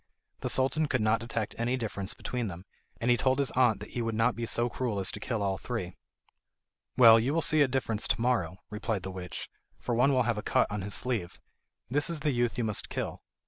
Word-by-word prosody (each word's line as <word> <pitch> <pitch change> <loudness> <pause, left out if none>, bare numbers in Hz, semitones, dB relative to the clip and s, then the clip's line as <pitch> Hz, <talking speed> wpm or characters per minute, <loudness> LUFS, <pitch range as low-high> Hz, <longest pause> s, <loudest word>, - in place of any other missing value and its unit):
The - - -3
Sultan 135 +4 +2
could 125 - 0
not 110 +1 +2
detect 115 -3 -4
any 120 +2 0
difference 100 -4 -4
between 125 -2 -4
them, 90 0 -8 0.3
and 120 +1 +1
he 120 - +4
told 130 +1 +1
his 140 -2 0
aunt 125 -5 +3
that 105 - -9
he 120 - -3
would 115 -1 -2
not 115 +2 +2
be 115 0 -4
so 120 +1 +1
cruel 120 -3 -3
as 95 - +5
to 105 - -7
kill 110 -1 -2
all 95 -1 -1
three. 105 -8 -5 1.0
"Well, 115 -2 +8
you 130 +7 0
will 165 - +3
see 155 +1 +6
a 140 - +5
difference 125 -5 -1
to - - 0
morrow," 115 -8 0
replied 105 -2 -3
the 95 - -5
witch, 90 -1 -6 0.3
"for 120 - -3
one 125 +4 +3
will 130 -2 +3
have 120 -2 -1
a - - -4
cut - - +2
on 105 -1 -3
his 100 +1 -3
sleeve. 110 -9 -2 0.5
That 145 +3 +2
is 165 -3 -2
the 150 -1 +1
youth 120 -2 0
you 120 - 0
must 105 -2 +2
kill." - - -4
115 Hz, 235 wpm, -29 LUFS, 105-125 Hz, 1.0 s, Well